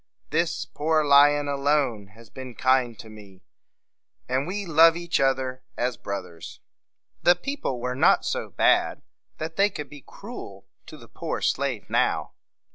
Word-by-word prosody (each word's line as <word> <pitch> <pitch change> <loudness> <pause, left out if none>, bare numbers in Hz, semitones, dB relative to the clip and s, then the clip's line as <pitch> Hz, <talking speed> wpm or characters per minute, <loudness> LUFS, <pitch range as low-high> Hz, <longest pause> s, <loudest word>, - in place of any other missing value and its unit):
This 170 +2 0
poor 155 0 0
lion 145 +1 +5
alone 140 -7 0
has 115 -1 -17
been 130 -2 -9
kind 130 -3 +1
to 110 - -11
me; 100 -3 -14 0.8
and 130 +3 -1
we 200 +2 -4
love 165 0 +5
each 170 0 -1
other 130 -1 0 0.2
as 125 0 -1
brothers." 90 -4 -7 0.6
The 175 - +5
people 265 - -4
were 125 +1 -3
not 130 - +3
so - - -3
bad - - +2 0.3
that 160 +1 -6
they 200 +1 +4
could 150 -7 -8
be 145 -1 -11
cruel 135 - -10 0.2
to - - -11
the - - -15
poor - - -5
slave - - -1
now. - - 0
140 Hz, 150 wpm, -25 LUFS, 125-160 Hz, 0.8 s, lion